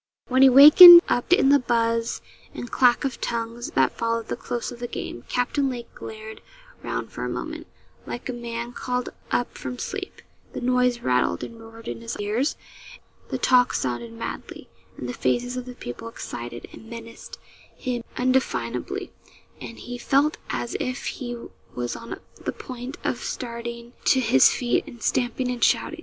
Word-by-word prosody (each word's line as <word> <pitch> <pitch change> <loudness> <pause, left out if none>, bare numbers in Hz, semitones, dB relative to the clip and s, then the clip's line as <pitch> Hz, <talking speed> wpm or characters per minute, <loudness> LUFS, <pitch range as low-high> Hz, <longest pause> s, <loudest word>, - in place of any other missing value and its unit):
When 260 +1 +3
he 270 - +9
wakened 340 +6 +11
up, 245 - -1
in 275 -6 +5
the 285 0 +6
buzz 230 -2 0 0.3
and 240 - -7
clack 250 +2 +3
of 265 -3 -4
tongues 235 +1 -3
that 130 -1 +3
followed 230 -1 -2
the - - -1
close 240 -1 -4
of 240 - -10
the 240 - -4
game, 120 - -7
Captain 270 +3 0
Lake 240 -2 -7
glared 220 0 -9 0.4
round - - -4
for - - -6
a - - -2
moment, - - -5 0.4
like 240 - -6
a 255 - -3
man 235 0 -5
called 250 0 -3 0.2
up 245 - -1
from 250 - -6
sleep; 390 +8 -6 0.3
the - - -4
noise 250 -1 +1
rattled 125 -9 +1
and 230 -1 -9
roared 225 0 -13
in - - -5
his 230 +1 -5
ears, 215 +8 0 0.7
the - - -2
talk 250 -1 +3
sounded 120 -2 -3
madly, 115 - -7 0.3
and 125 - -6
the 125 - -4
faces 245 - -1
of 250 -1 -5
the 250 - -8
people 120 - -8
excited 120 - -7
and 225 - -13
menaced 230 -1 -10 0.4
him 245 -2 -4
undefinably, 255 +1 -1 0.5
and 230 - -8
he 245 0 -7
felt 280 +5 +2
as 240 - -3
if 255 +1 -3
he 240 -2 -4 0.4
was 120 0 -3
on 230 - -8 0.2
the - - -2
point 255 +1 -8
of - - -1
starting 235 - -6
to 265 - +4
his 175 - +5
feet 240 -1 0
and 240 -6 -11
stamping 250 0 0
and 245 -2 -3
shouting. 280 +8 +2
240 Hz, 170 wpm, -24 LUFS, 230-255 Hz, 0.7 s, wakened